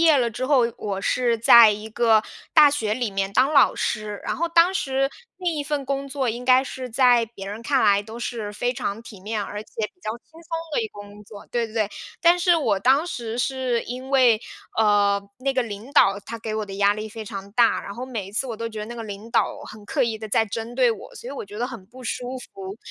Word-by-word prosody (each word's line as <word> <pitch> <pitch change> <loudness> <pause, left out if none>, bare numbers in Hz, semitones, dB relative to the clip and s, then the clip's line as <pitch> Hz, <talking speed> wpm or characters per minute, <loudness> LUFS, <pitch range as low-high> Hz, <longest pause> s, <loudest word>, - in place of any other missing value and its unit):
业 325 -2 +6
了 240 -2 +1
之 245 +3 -4
后， 260 -4 +3
我 200 -2 -4
是 235 +2 +1
在 230 0 +8
一 210 +1 -4
个 220 -1 +3 0.3
大 300 -3 +8
学 220 -7 -1
里 235 -2 -1
面 195 0 -2
当 260 +7 +3
老 275 - +6
师。 210 -1 -3
然 - - -3
后 340 - 0
当 340 +3 +5
时 270 -4 0 0.3
那 360 - -1
一 300 -4 -2
份 295 -1 -2
工 275 0 -2
作 270 -2 -2
应 240 +2 -3
该 255 +1 +6
是 260 -1 -7
在 245 -1 +4
别 205 -4 -10
人 210 +3 -7
看 270 +2 +2
来 205 -1 +4
都 220 +2 -9
是 225 -4 -4
非 245 +4 -1
常 205 -2 -3
体 220 -3 -12
面， 210 +2 -3
而 205 +1 -6
且 - - -24 0.2
比 - - -39
较 215 - -3
轻 - - -56
松 330 +1 -14 0.3
的 - - +1
一 - - -2
个 205 - -12
工 205 0 -12
作 205 -1 -12
对 235 -1 0
对 220 - -14
对。 215 -2 0 0.3
但 345 +1 +5
是 350 0 +4
我 220 -11 +1
当 270 - +3
时 235 -7 -5
是 255 -2 0
因 255 +2 -7
为， 250 -5 +5 0.4
呃， 205 -2 +3 0.2
那 270 +1 -1
个 260 - +2
领 220 +2 -8
导 200 -7 +4
他 230 +3 -7
给 220 -1 -4
我 215 -1 -2
的 195 - -7
压 200 +1 +3
力 215 +1 -5
非 220 0 -8
常 200 -1 -7
大， 235 +1 +3
然 200 - -7
后 245 - -5
每 230 -7 -5
一 195 - -12
次 245 +5 -1
我 235 - -4
都 230 +1 -4
觉 220 -1 -8
得 210 - -3
那 235 +2 -8
个 235 - -6
领 210 +1 -8
导 - - +1
很 215 0 -11
刻 - - 0
意 225 -2 -1
地 220 0 -7
在 220 +2 +3
针 225 +2 -5
对 250 -1 +4
我， 225 - -7
所 - - -10
以 260 - -5
我 275 - -6
觉 205 +1 -9
得 240 - 0
很 230 -7 -9
不 255 +5 -13
舒 250 +2 -4 0.2
服。 195 +1 -8
230 Hz, 275 characters per minute, -23 LUFS, 210-260 Hz, 0.4 s, 在